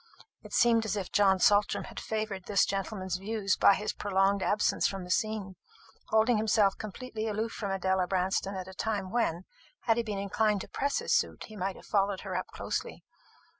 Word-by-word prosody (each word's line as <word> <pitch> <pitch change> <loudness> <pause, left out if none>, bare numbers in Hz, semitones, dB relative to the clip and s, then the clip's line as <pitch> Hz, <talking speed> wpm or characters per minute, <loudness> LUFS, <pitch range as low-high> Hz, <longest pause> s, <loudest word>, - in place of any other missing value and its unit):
It - - -13
seemed 230 -1 +4
as 210 -1 -1
if 195 -3 -4
John 195 -2 +4
Saltram 205 +2 +3
had - - -8
favoured 215 -4 -3
this 200 -2 +3
gentleman's 190 -2 -3
views 200 0 -1
by 200 - +6
his 210 - -3
prolonged 195 0 +1
absence 210 +2 +2
from 195 -2 -5
the 180 - -6
scene, 205 -2 -1 0.5
holding 220 +1 +3
himself 210 -2 +3
completely 220 +1 -5
aloof 220 +2 -2
from 205 - -4
Adela 190 -1 +1
Branston 190 +1 0
at 185 -1 -5
a 190 - -9
time 200 -2 -2
when, 190 -8 0 0.4
had 225 -1 +2
he - - +2
been 210 -3 -4
inclined 205 +1 +1
to - - -8
press 280 +1 -1
his - - 0
suit, - - 0
he 215 - -11
might 190 -1 -2
have - - -14
followed 200 -1 +1
her 190 -2 -5
up 185 - -2
closely. - - -4
200 Hz, 195 wpm, -30 LUFS, 190-215 Hz, 0.5 s, by